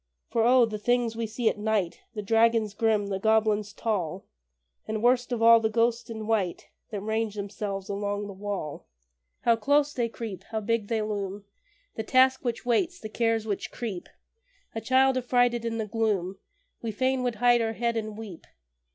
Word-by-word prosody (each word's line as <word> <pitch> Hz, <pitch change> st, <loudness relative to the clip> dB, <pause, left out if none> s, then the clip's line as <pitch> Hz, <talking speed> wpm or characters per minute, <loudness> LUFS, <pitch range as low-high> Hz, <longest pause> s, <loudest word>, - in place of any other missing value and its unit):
For 230 Hz, -, +2 dB
O! 245 Hz, +1 st, +6 dB
the 215 Hz, -2 st, -5 dB
things 240 Hz, 0 st, +1 dB
we 230 Hz, 0 st, -2 dB
see 225 Hz, +2 st, -2 dB
at 210 Hz, -, +1 dB
night 210 Hz, -5 st, 0 dB, 0.2 s
The 210 Hz, -, -4 dB
dragons 225 Hz, 0 st, +3 dB
grim, 215 Hz, -2 st, +1 dB
the 195 Hz, -1 st, -2 dB
goblins 215 Hz, -1 st, +2 dB
tall, 195 Hz, -5 st, -2 dB, 0.6 s
And, 215 Hz, 0 st, -3 dB
worst 245 Hz, +1 st, +3 dB
of 230 Hz, -2 st, -1 dB
all, 230 Hz, 0 st, +8 dB
the 220 Hz, -1 st, 0 dB
ghosts 235 Hz, +1 st, +1 dB
in 220 Hz, -1 st, -5 dB
white 210 Hz, -5 st, -1 dB, 0.2 s
That 205 Hz, -3 st, -4 dB
range 220 Hz, 0 st, -1 dB
themselves 200 Hz, -1 st, -4 dB
along 205 Hz, 0 st, -2 dB
the 200 Hz, -, -7 dB
wall! 195 Hz, -6 st, -5 dB, 0.5 s
How 235 Hz, -, +4 dB
close 285 Hz, +6 st, +2 dB
they 235 Hz, -2 st, -1 dB
creep! 215 Hz, -5 st, -7 dB
How 220 Hz, -, -3 dB
big 220 Hz, 0 st, -1 dB
they 225 Hz, -1 st, 0 dB
loom! 200 Hz, -1 st, -4 dB, 0.5 s
The 220 Hz, -, -2 dB
Task 260 Hz, +3 st, +4 dB
which 240 Hz, -2 st, -3 dB
waits, 340 Hz, +9 st, +1 dB
the 215 Hz, -, -7 dB
Cares 225 Hz, 0 st, 0 dB
which 205 Hz, -3 st, -3 dB
creep; 210 Hz, -7 st, -5 dB, 0.6 s
A 225 Hz, -, -4 dB
child, 260 Hz, +3 st, +3 dB
affrighted 245 Hz, -1 st, +2 dB
in 225 Hz, -1 st, -2 dB
the 220 Hz, -, -2 dB
gloom, 205 Hz, -4 st, -1 dB, 0.4 s
We 230 Hz, -, -3 dB
fain 260 Hz, +4 st, 0 dB
would 245 Hz, -2 st, -1 dB
hide 240 Hz, +1 st, +4 dB
our 225 Hz, 0 st, -1 dB
head 235 Hz, +1 st, -1 dB
and 215 Hz, -1 st, -4 dB
weep. 210 Hz, -7 st, -9 dB
225 Hz, 185 wpm, -27 LUFS, 205-235 Hz, 0.6 s, all